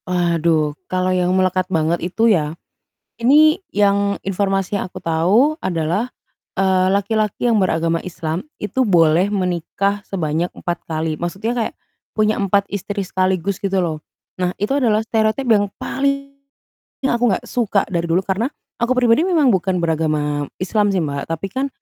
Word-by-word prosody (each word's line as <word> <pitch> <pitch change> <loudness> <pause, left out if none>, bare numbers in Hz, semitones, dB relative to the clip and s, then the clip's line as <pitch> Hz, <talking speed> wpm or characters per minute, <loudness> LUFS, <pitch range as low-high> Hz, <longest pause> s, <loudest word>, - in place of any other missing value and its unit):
Waduh 170 -4 +1 0.2
kalau 185 0 0
yang 180 -1 +1
melekat 185 0 +1
banget 165 -1 0
itu 185 +6 0
ya, 165 -8 +2 0.6
ini 310 - +4
yang 200 0 +2
informasi 195 0 0
yang 200 - -1
aku - - -8
tahu 190 - +2
adalah, 175 +7 -1 0.5
eee, 190 -1 +3
laki-laki 210 +3 0
yang 235 - +3
beragama 165 -1 0
Islam 170 -1 -4 0.2
itu 260 +5 0
boleh 175 -2 +3
menikah 195 +2 -1
sebanyak 170 -2 -2
4 175 -1 -5
kali, 160 -1 -2
maksudnya 195 +9 -3
kayak 230 -2 -1 0.4
punya 215 0 +1
4 200 0 +1
istri 200 0 -4
sekaligus 185 +1 0
gitu 195 -1 +1
loh. 160 -4 -2 0.4
Nah, 180 -1 0
itu 205 - -1
adalah 230 -7 +2
stereotip 220 +3 0
yang 205 -2 +4
paling 275 0 -1 0.7
aku 245 -2 +1
enggak 185 - -2
suka 215 -5 +1
dari 170 -4 -1
dulu, 170 +3 +3
karena 200 +6 0 0.3
aku 235 +2 +2
pribadi 245 +5 +4
memang 320 -7 +3
bukan 190 0 +1
beragama 155 -3 0
Islam 205 +3 +1
sih, 185 -4 +1
Mbak, 140 -2 -4
tapi 165 +4 -3
kan 270 +2 -1
190 Hz, 150 wpm, -19 LUFS, 170-215 Hz, 0.7 s, ini